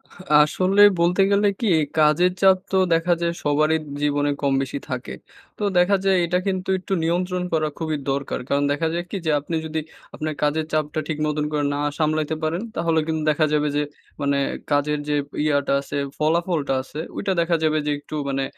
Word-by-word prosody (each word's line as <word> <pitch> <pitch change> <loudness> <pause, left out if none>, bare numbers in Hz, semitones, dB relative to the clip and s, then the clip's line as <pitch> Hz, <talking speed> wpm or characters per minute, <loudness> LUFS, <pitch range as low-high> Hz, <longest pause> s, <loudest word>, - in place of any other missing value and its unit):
হা 180 - -13 0.2
আসলে 185 +6 +2 0.2
বলতে 175 +3 +3
গেলে 200 +1 +3
কী? 230 - 0 0.3
কাজের 155 +4 +4
চাপ 190 -1 +6
তো 190 - +2 0.2
দেখা 165 +2 +2
যায় 170 - +1
সবারই 155 +2 +2
ইপ 155 - -10 0.2
জীবনে 145 0 +1
কম, 140 -1 +1
বেশি 135 +1 -4
থাকে। 130 0 -4 0.4
তো - - -4
দেখা 180 +3 +4
যায় 195 - +4
এটা 175 +2 +1
কিন্তু 190 -1 -2
একটু 190 +1 -4
নিয়ন্ত্রণ 180 +2 0
করা 155 -1 +2
খুবই 160 -2 -1
দরকার। 140 0 -2
কারণ 140 0 +2
দেখা 145 +3 0
যায় 175 +1 -2
কী? 200 - -3
যে 155 - +2
আপনি 150 +4 -4
যদি 160 0 -2 0.4
আপনার 155 0 -3
কাজের 155 +2 +1
চাপটা 155 0 0
ঠিক 155 -2 -3
মতন 150 0 -1
করে 145 -1 0
না 145 - -2 0.2
সামলাইতে 155 0 0
পারেন, 160 +4 -1
তাহলে 165 -1 +1
কিন্তু 160 -1 -1
দেখা 155 +1 +2
যাবে 150 0 +2
যে 150 - +2 0.4
মানে 140 0 +1 0.3
কাজের 145 +1 +1
যে 150 - +2 0.3
ইয়াটা 145 -2 +1
আছে, 140 - -5 0.2
ফলাফলটা 160 -2 0
আছে, 150 - -9 0.2
ওইটা 195 -1 -1
দেখা 170 0 +1
যাবে 155 0 +2
যে 150 - 0
একটু 145 - -9
মানে 135 0 -1
155 Hz, 195 wpm, -22 LUFS, 150-175 Hz, 0.4 s, চাপ